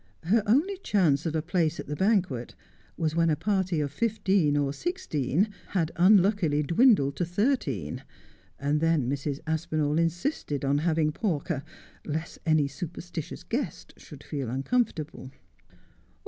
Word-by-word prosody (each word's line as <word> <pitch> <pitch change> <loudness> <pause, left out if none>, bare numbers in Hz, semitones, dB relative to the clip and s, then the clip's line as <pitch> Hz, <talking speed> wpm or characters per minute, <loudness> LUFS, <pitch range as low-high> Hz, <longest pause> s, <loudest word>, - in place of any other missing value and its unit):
Her 210 +7 +3
only 315 - +3
chance 175 - +2
of 160 - -2
a 155 - 0
place 170 -2 0
at - - -5
the 150 - -4
banquet 180 - 0 0.4
was 160 -2 -1
when 165 0 +3
a 155 - +3
party 185 0 0
of 145 -2 -1
fifteen 190 -5 +1
or 140 -1 0
sixteen 200 - -1 0.2
had 170 -4 -1
unluckily 185 -5 +4
dwindled 170 - +4
to - - 0
thirteen, 175 - -1 0.6
and 145 +2 0
then 165 -6 +2
Mrs. 140 +1 -2
Aspinali 155 -1 0
insisted 165 - -1
on 140 +1 +2
having 160 -1 +1
Pawker, 160 - -2 0.4
lest 160 +2 -4
any 155 -3 +4
superstitious 165 +2 -7
guest - - -4
should - - -12
feel 140 -5 -4
uncomfortable. 150 - -1
160 Hz, 135 wpm, -27 LUFS, 145-190 Hz, 0.6 s, unluckily